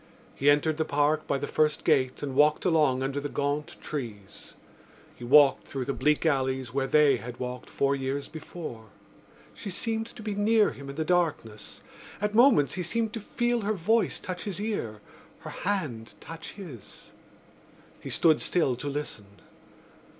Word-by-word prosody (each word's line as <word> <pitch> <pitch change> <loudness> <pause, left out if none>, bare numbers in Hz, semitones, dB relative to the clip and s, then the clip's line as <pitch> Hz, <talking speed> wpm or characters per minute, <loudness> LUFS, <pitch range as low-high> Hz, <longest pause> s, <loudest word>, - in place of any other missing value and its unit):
He 140 - +2
entered 150 +1 +3
the 160 - +1
Park 145 +1 +1
by 140 - +1
the 145 - -3
first 150 0 +1
gate 135 -4 +1
and 140 -2 -3
walked 150 +2 +3
along 150 -7 +3
under 135 +1 -2
the 145 0 -4
gaunt 145 +1 -2
trees. 105 -9 -7 0.6
He - - -12
walked 140 +2 +5
through 135 -2 -4
the 140 - -1
bleak 150 +5 +1
alleys 130 -4 0
where 135 -1 0
they 145 -2 +5
had 120 +1 -8
walked 125 0 -5
four 140 0 +1
years 135 +1 -3
before. 155 -8 -8 0.7
She 205 - -7
seemed 225 +4 -2
to 220 - -11
be 210 -1 -2
near 210 +1 +3
him 140 +4 -10
in 140 - -7
the 160 +1 -2
darkness. 155 -11 -1 0.4
At 210 +1 -1
moments 230 - +5
he 185 - -3
seemed 220 +5 -2
to 230 - -3
feel 240 +2 -1
her 210 +1 0
voice 215 +5 +1
touch 180 -1 -6
his 200 -3 -4
ear, 160 - -3 0.4
her - - -7
hand 140 - -3
touch 165 0 -9
his. 165 - -11 0.9
He - - -8
stood 160 -3 +3
still 150 -8 +1
to 145 - -6
listen. 140 -8 -5
150 Hz, 170 wpm, -27 LUFS, 135-180 Hz, 0.9 s, walked